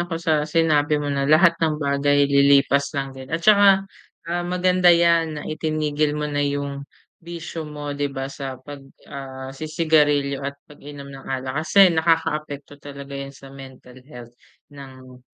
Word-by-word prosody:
ako 175 Hz, -1 st, -3 dB
sa 165 Hz, -1 st, 0 dB
sinabi 155 Hz, -2 st, +2 dB
mo 145 Hz, -1 st, -2 dB
na 140 Hz, 0 st, -1 dB
lahat 170 Hz, +3 st, +5 dB
ng 155 Hz, -2 st, +1 dB
bagay 145 Hz, 0 st, +1 dB
lilipas 140 Hz, 0 st, +3 dB
lang 135 Hz, -1 st, -3 dB
din. 130 Hz, 0 st, -11 dB
At 165 Hz, +2 st, -4 dB
saka, 200 Hz, -2 st, +5 dB, 0.4 s
ah, 175 Hz, +1 st, -3 dB
maganda 180 Hz, 0 st, +2 dB
yan 170 Hz, -2 st, +3 dB
na 150 Hz, -, -6 dB
itinigil 155 Hz, -1 st, -2 dB
mo 150 Hz, -, -3 dB
na 145 Hz, -1 st, -2 dB
yung 140 Hz, 0 st, -3 dB, 0.3 s
bisyo 165 Hz, -2 st, -7 dB
mo, 145 Hz, -1 st, -6 dB
di 145 Hz, 0 st, -2 dB
ba? 135 Hz, 0 st, -6 dB
Sa 135 Hz, -2 st, -6 dB
pag 145 Hz, 0 st, -9 dB, 0.2 s
ah, 130 Hz, -1 st, -8 dB
si-sigarilyo 150 Hz, -2 st, +1 dB
at 140 Hz, 0 st, -5 dB
pag-inom 145 Hz, -1 st, -12 dB
ng 135 Hz, -, -10 dB
alak. 130 Hz, -1 st, -4 dB, 0.2 s
Kasi 195 Hz, -1 st, +6 dB
nakakaapekto 155 Hz, -3 st, -1 dB
talaga 140 Hz, -1 st, -10 dB
yun 140 Hz, 0 st, -6 dB
sa 135 Hz, 0 st, -14 dB
mental 130 Hz, -2 st, -13 dB
health 120 Hz, -4 st, -12 dB, 0.4 s
ng 130 Hz, -2 st, -13 dB
145 Hz, 160 wpm, -22 LUFS, 140-160 Hz, 0.4 s, Kasi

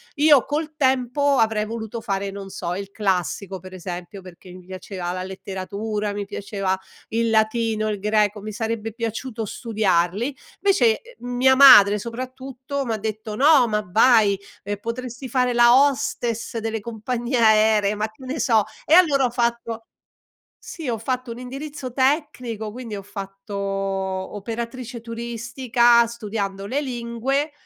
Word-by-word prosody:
Io 295 Hz, -3 st, +5 dB
col 305 Hz, +2 st, -3 dB
tempo 265 Hz, +1 st, +2 dB
avrei 220 Hz, -1 st, +2 dB
voluto 225 Hz, +1 st, -5 dB
fare, 200 Hz, -3 st, -3 dB
non 195 Hz, 0 st, -8 dB
so, 175 Hz, -2 st, -4 dB
il 195 Hz, +1 st, -5 dB
classico 190 Hz, -1 st, -2 dB
per 185 Hz, +1 st, -12 dB
esempio, 180 Hz, +1 st, -7 dB
perché 185 Hz, 0 st, -14 dB
mi 180 Hz, 0 st, -12 dB
piaceva 185 Hz, -1 st, -6 dB
la 185 Hz, 0 st, -4 dB
letteratura, 200 Hz, +2 st, -4 dB
mi 205 Hz, -, -3 dB
piaceva 195 Hz, -1 st, -3 dB, 0.3 s
il 230 Hz, +1 st, 0 dB
latino, 220 Hz, 0 st, +1 dB
il 205 Hz, -2 st, -3 dB
greco, 210 Hz, 0 st, +1 dB
mi 215 Hz, +1 st, -7 dB
sarebbe 225 Hz, 0 st, -3 dB
piaciuto 230 Hz, +1 st, -4 dB
studiarli. 210 Hz, +1 st, 0 dB, 0.3 s
Vece, 245 Hz, -, +3 dB
ehm, 470 Hz, -, -12 dB
mia 265 Hz, +1 st, +5 dB
madre 210 Hz, -7 st, +9 dB
soprattutto, 260 Hz, +3 st, -5 dB
m'ha 225 Hz, -2 st, -1 dB
detto: 215 Hz, 0 st, -5 dB
"No, 275 Hz, -1 st, +5 dB
ma 210 Hz, -1 st, -1 dB
vai, 210 Hz, 0 st, +4 dB, 0.2 s
ehm, 205 Hz, 0 st, -3 dB
potresti 245 Hz, +4 st, -6 dB
fare 250 Hz, 0 st, +1 dB
la 240 Hz, 0 st, +6 dB
hostess 250 Hz, -5 st, 0 dB
delle 225 Hz, 0 st, -3 dB
compagnie 235 Hz, +3 st, -3 dB
aeree", 215 Hz, -2 st, +4 dB
ma 215 Hz, +1 st, -2 dB
che 220 Hz, +4 st, -17 dB
ne 275 Hz, +4 st, -4 dB
so, 225 Hz, -5 st, +3 dB, 0.2 s
e -, -, +2 dB
allora 305 Hz, -7 st, +6 dB
ho -, -, +1 dB
fatto 235 Hz, -1 st, -2 dB, 0.8 s
sì 315 Hz, -6 st, -6 dB
ho 230 Hz, -, -1 dB
fatto 255 Hz, +2 st, -3 dB
un 230 Hz, -, -6 dB
indirizzo 265 Hz, +1 st, -7 dB
tecnico, 255 Hz, -6 st, -1 dB
quindi 230 Hz, -2 st, -7 dB
ho 200 Hz, -, -7 dB
fatto 195 Hz, 0 st, -8 dB
operatrice 200 Hz, +5 st, -4 dB
turistica 235 Hz, +1 st, +2 dB
studiando 205 Hz, -4 st, -4 dB
le 275 Hz, +6 st, -1 dB
lingue, 255 Hz, +3 st, -2 dB
225 Hz, 145 wpm, -23 LUFS, 205-250 Hz, 0.8 s, madre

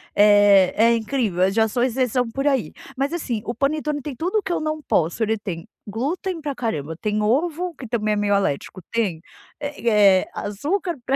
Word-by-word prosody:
Eh, 205 Hz, -2 st, +6 dB
é 230 Hz, +2 st, +5 dB
incrível, 220 Hz, -5 st, -1 dB
eh, 190 Hz, -, +3 dB
já 220 Hz, +1 st, +2 dB
sou 240 Hz, +2 st, -1 dB
exceção 250 Hz, -1 st, +1 dB
por 275 Hz, +5 st, -2 dB
aí. 270 Hz, -4 st, +1 dB, 0.3 s
Mas 275 Hz, +2 st, 0 dB
assim, 250 Hz, -10 st, -2 dB
o 235 Hz, -, -3 dB
panetone 295 Hz, +1 st, -1 dB
tem 275 Hz, -1 st, -6 dB
tudo 360 Hz, -, -1 dB
o -, -, -4 dB
que 380 Hz, -, -4 dB
eu -, -, 0 dB
não 310 Hz, 0 st, -3 dB
posso, 175 Hz, -, 0 dB
ele 220 Hz, 0 st, 0 dB
tem 180 Hz, -5 st, -6 dB, 0.2 s
glúten 320 Hz, -, -3 dB
para 290 Hz, -2 st, -3 dB
caramba, 160 Hz, -, -3 dB
tem 210 Hz, -1 st, -1 dB
ovo, 330 Hz, +10 st, 0 dB
que 250 Hz, -, -9 dB
também 215 Hz, -2 st, 0 dB
é -, -, +1 dB
meio 205 Hz, 0 st, +1 dB
alérgico, 185 Hz, -1 st, -2 dB
tem, 200 Hz, -9 st, -1 dB, 0.4 s
eh 215 Hz, -9 st, +3 dB
eh, -, -, -13 dB
açúcar 310 Hz, -, -2 dB
para 270 Hz, -, +1 dB
235 Hz, 200 wpm, -22 LUFS, 205-290 Hz, 0.4 s, Eh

